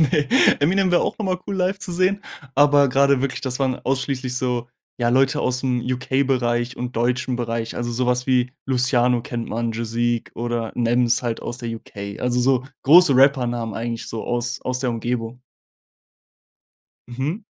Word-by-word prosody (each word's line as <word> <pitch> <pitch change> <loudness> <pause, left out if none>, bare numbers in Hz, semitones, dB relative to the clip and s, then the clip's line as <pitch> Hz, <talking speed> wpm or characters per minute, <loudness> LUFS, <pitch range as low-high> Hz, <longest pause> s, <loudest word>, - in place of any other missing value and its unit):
Ne, 150 -1 +2 0.3
„Eminem“ 185 +5 +2
wär 175 - +4
auch - - -2
einmal 185 -4 -1
cool 195 - -3
live 185 +1 0
zu 180 -2 -7
sehen, 185 +3 +1 0.3
aber 145 0 +5
grade 140 0 +3
wirklich, 135 -1 -2
das 130 -2 -4
waren 130 -2 0
ausschließlich 130 -1 -2
so 125 -1 -2 0.3
ja, 120 0 +2
Leute 135 +2 +2
ausm 125 0 0
UK-Bereich 125 -1 -1
und 125 -1 -5
deutschen 125 +1 0
Bereich, 115 -1 -3
also 120 0 -3
sowas 125 +1 0
wie 125 -1 +2 0.2
„Luciano“ 125 -2 +2
kennt 120 -3 -5
man, 115 +1 -2
„Joseque“ 115 +1 -2
oder 120 -1 -3
„Nems“ 120 0 +2
halt 120 -2 -2
aus 120 - -6
der 120 -3 -5
UK. 100 -2 -9
Also 125 0 0
so 130 0 +2 0.2
große 160 0 +7
Rappernamen 120 -5 +2
eigentlich 115 +1 -4
so 115 - -5
aus 120 +1 -2
aus 130 0 -2
der 125 -2 0
Umgebung. 120 +1 -3 1.7
Mhm. 140 - -3
125 Hz, 160 wpm, -22 LUFS, 120-135 Hz, 1.7 s, große